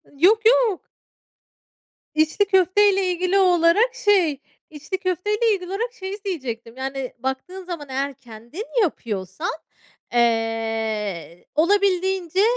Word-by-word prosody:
Yok, 390 +10 +4
yok. 465 -5 +4 1.3
İçli 315 +6 +2
köfteyle 385 0 +3
ilgili 365 +2 +1
olarak, 365 +5 +4
şey 355 -9 +3 0.3
içli 305 +5 -5
köfteyle 415 +5 0
ilgili 365 -3 -4
olarak 460 +5 -3
şeyi 390 -3 -6
diyecektim: 245 - -5
Yani, 265 -1 -4
baktığın 265 +9 -4
zaman 335 -6 -7
eğer 275 +2 -2
kendin 245 - -10 0.2
yapıyorsan, 200 - -2 0.6
eee, 225 -7 -1
olabildiğince, 380 +1 +2
345 Hz, 100 wpm, -22 LUFS, 250-390 Hz, 1.3 s, Yok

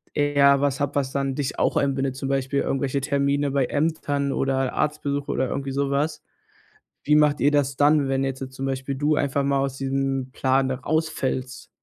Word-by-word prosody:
eher 140 -1 +4
was 140 0 0
habt, 145 -1 -2
was 135 -2 0
dann 135 -1 -1
dich 140 -2 -3
auch - - +1
einbindet, 135 -1 0
zum 135 0 -4
Beispiel 135 0 0
irgendwelche 135 0 -1
Termine 140 0 0
bei 135 -2 +1
Ämtern 145 -1 -1
oder 135 -1 0
Arztbesuch 145 -2 -1
oder 130 - 0
irgendwie 135 -1 -3
so 140 0 -1
was: 150 +2 -1 0.8
Wie 150 +1 +3
macht 150 -1 +4
ihr 145 +3 +4
das 140 -2 +1
dann, 145 -1 +3
wenn 135 0 +1
jetzt 135 -1 -4
zum 135 +1 -5
Beispiel 135 +1 -3
du 150 +3 +1
einfach 140 -1 0
mal 140 0 +1
aus 135 -1 -2
diesem 135 -1 -2
Plan 130 0 +1
da 130 - -1
rausfällst? 130 -3 -2
140 Hz, 190 wpm, -24 LUFS, 135-145 Hz, 0.8 s, eher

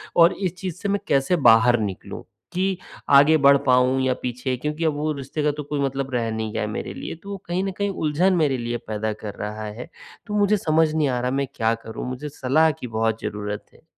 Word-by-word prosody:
और 170 +1 +6
इस 185 -3 -3
चीज़ 185 -4 -4
से 200 - -2
मैं 200 0 +1
कैसे 140 +6 +2 0.2
बाहर 120 +1 +5
निकलूँ 100 -3 -5 0.3
कि, 190 0 0 0.3
आगे 140 +3 +7
बढ़ 140 -1 +6
पाऊँ 125 +1 +4
या 130 -1 +2
पीछे 125 +1 -2
क्योंकि 150 +4 -3
अब 155 - +2
वो 155 +1 -1
रिश्ते 140 +2 -4
का 150 - +3
तो 150 0 -6
कोई 145 0 -3
मतलब 135 0 -2
रह 115 -2 0
नहीं 110 -1 -3
गया - - -2
है - - -1
मेरे - - -5
लिए। - - -6
तो 200 - -9
वो 200 - -4
कहीं 180 +2 -1
न 195 - -2
कहीं 200 0 0
उलझन 180 +1 +1
मेरे 145 -6 +2
लिए 120 0 -3
पैदा 110 0 -2
कर 105 - -5
रहा 105 +1 -4
है। 115 +9 -7 0.4
तो 210 - -5
मुझे 205 +1 +3
समझ 160 -2 +2
नहीं 155 -2 +2
आ 125 -1 0
रहा 125 +1 -1
मैं 140 0 0
क्या 115 0 +2
करूँ? 115 +2 -7
मुझे 135 +4 -5
सलाह 150 +4 +2
की 125 -3 -8
बहुत 110 0 -1
ज़रूरत 105 0 -4
है। - - -23
140 Hz, 235 wpm, -23 LUFS, 120-160 Hz, 0.4 s, आगे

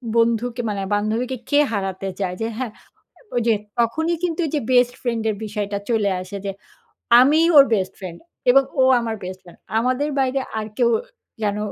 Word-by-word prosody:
বন্ধুকে 235 +1 +1
মানে 200 -1 -2
বান্ধবীকে 225 +5 -1
কে 290 - +4
হারাতে 195 -2 -3
চায়? 185 -2 -2
যে 225 - 0
হ্যাঁ, 255 -3 -3 0.6
ওইযে 235 -1 +2 0.3
তখনই 320 +9 +1
কিন্তু 345 -1 -1
ওইযে 300 0 -1
বেস্ট 245 -1 +4
ফ্রেন্ডের 225 -3 -1
বিষয়টা 205 -1 -3
চলে 220 -4 +2
আসে, 185 +2 -7
যে 195 - -1 0.7
আমিই 305 +6 +5
ওর 280 - +10
বেস্ট 190 -2 -1
ফ্রেন্ড 180 -4 -8 0.3
এবং 270 +2 +6 0.2
ও - - +6 0.2
আমার 230 -1 -3
বেস্ট 185 +1 -6
ফ্রেন্ড। 175 - -16 0.2
আমাদের 255 +5 0
বাইরে 265 0 +1 0.2
আর 215 - -3
কেউ 240 -2 +4 0.5
যেন 205 -1 0
230 Hz, 165 wpm, -21 LUFS, 205-255 Hz, 0.7 s, ওর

